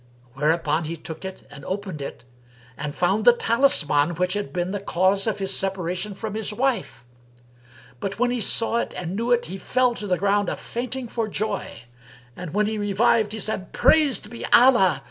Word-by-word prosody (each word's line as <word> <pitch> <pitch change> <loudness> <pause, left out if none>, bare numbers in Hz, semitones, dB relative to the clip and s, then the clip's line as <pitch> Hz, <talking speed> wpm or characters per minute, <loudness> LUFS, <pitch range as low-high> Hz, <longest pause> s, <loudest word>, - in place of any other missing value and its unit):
Whereupon 155 +2 0
he 165 +2 -4
took 160 +2 -8
it 190 0 -8
and 145 -1 -11
opened 190 -3 -5
it 140 - -7 0.5
and 145 0 -5
found 195 +4 +1
the 240 - +7
talisman 175 - +3
which 180 +2 0
had 205 0 -3
been 180 0 -2
the 205 - -3
cause 195 +2 +1
of 220 - 0
his 195 -1 -1
separation 190 +1 -2
from 215 +1 -5
his 215 -1 -2
wife. 235 - -2 0.9
But 195 +5 -4
when 245 +1 +1
he 245 -2 -1
saw 230 +3 +3
it - - -3
and 180 +1 -4
knew 230 +3 -2
it, 240 0 +3
he 190 +4 -7
fell 250 +5 +1
to 210 -3 -5
the 180 -2 +1
ground 200 +1 +1
a - - -2
fainting 250 +1 -5
for 225 -1 -2
joy; 205 - -4 0.5
and, 180 -3 -7
when 210 +4 +1
he 215 0 -2
revived, 210 +1 +2
he 220 - -4
said, 210 -2 -2
"Praised 280 -9 +3
be 235 - -8
Allah! 235 -9 +5
200 Hz, 190 wpm, -23 LUFS, 180-225 Hz, 0.9 s, the